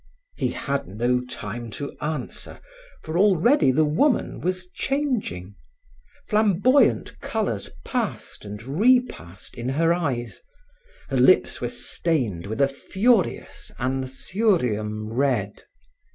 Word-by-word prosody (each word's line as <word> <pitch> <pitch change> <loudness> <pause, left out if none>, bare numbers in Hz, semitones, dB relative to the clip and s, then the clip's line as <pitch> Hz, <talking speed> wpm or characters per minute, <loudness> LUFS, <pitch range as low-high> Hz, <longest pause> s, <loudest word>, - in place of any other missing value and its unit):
He - - 0
had 140 -6 -3
no 120 +6 +1
time 120 -1 -6
to 145 - -6
answer, 150 -4 -5 0.4
for 160 +2 -2
already 205 - +4
the 155 +4 +3
woman 225 - +1
was 185 +1 -2
changing. 235 - -2 0.7
Flamboyant 215 +5 +3
colors 200 - -2 0.2
passed - - -3
and 105 +1 -8
repassed 160 - +1
in 120 +1 -4
her 165 +5 +2
eyes. 130 -9 -3 0.7
Her - - 0
lips - - +4
were - - -1
stained 120 - -2
with 110 +6 -2
a 140 - +5
furious 190 - 0
Anthurium 130 - -1
red. 120 -6 0
140 Hz, 110 wpm, -24 LUFS, 120-195 Hz, 0.7 s, a